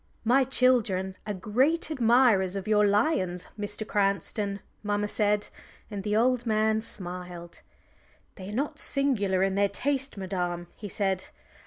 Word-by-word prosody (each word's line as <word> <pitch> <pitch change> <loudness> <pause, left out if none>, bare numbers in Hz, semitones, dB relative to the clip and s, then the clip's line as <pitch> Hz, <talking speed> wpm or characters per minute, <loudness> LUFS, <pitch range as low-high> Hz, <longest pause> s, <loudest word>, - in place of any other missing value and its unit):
"My 250 +4 +4
children 235 -8 +2
are 210 - -1
great 265 - +1
admirers 230 -8 +4
of 195 0 -4
your 210 -1 +4
lions, 200 - +1
Mr. 210 +1 -3
Cranston," 200 0 0 0.2
mamma 205 0 -1
said; 210 0 0 0.4
and 205 -1 -4
the 210 +1 0
old 245 +2 +3
man 220 0 +2
smiled. 180 -4 -8 0.7
"They 190 -1 -9
are 210 - -5
not 290 +3 -2
singular 205 -10 +1
in 195 0 +1
their 200 +1 +2
taste, 270 -1 -2
madam," 180 -2 -3
he 205 - -8
said. 190 -1 -1
205 Hz, 140 wpm, -27 LUFS, 190-240 Hz, 0.7 s, My